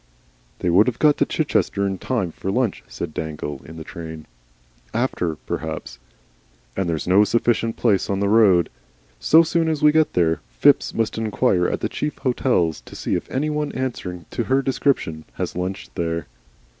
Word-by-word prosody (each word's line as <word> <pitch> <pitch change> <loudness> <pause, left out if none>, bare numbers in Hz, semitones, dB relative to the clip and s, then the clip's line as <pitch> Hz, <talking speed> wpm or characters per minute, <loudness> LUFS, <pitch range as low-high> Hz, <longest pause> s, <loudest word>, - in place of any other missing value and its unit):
"They 90 - +1
would 100 +7 +5
have 120 -2 -1
got 150 -1 +4
to - - +3
Chichester 100 - 0
in 95 -1 -2
time 110 -10 -1
for 95 - -5
lunch," 115 0 0
said 85 -3 -6
Dangle, 75 -3 -5
in 80 - -10
the 80 - -7
train. 80 -1 -8 0.7
"After, 100 -9 0
perhaps. 80 -4 -5 0.8
And 95 -3 -1
there's 80 -2 -2
no 95 +3 +6
sufficient 115 +1 +1
place 105 -6 +2
in 100 -1 0
the 100 - +1
road. 100 -5 +4 0.5
So 160 +1 +6
soon 165 0 +1
as 155 -2 -2
we 150 - +7
get 155 0 +2
there, 80 -2 +2 0.2
Phipps - - +4
must 110 -1 -1
inquire 110 -4 +1
at - - -2
the - - 0
chief 150 - -3
hotels 120 - +1
to - - -11
see - - -3
if - - -2
any 150 +4 -1
one 150 0 -1
answering 90 -10 -4
to 120 - -2
her 135 +1 +2
description 125 - 0
has - - -4
lunched 95 +2 -4
there." 85 0 -2
100 Hz, 180 wpm, -22 LUFS, 85-130 Hz, 0.8 s, we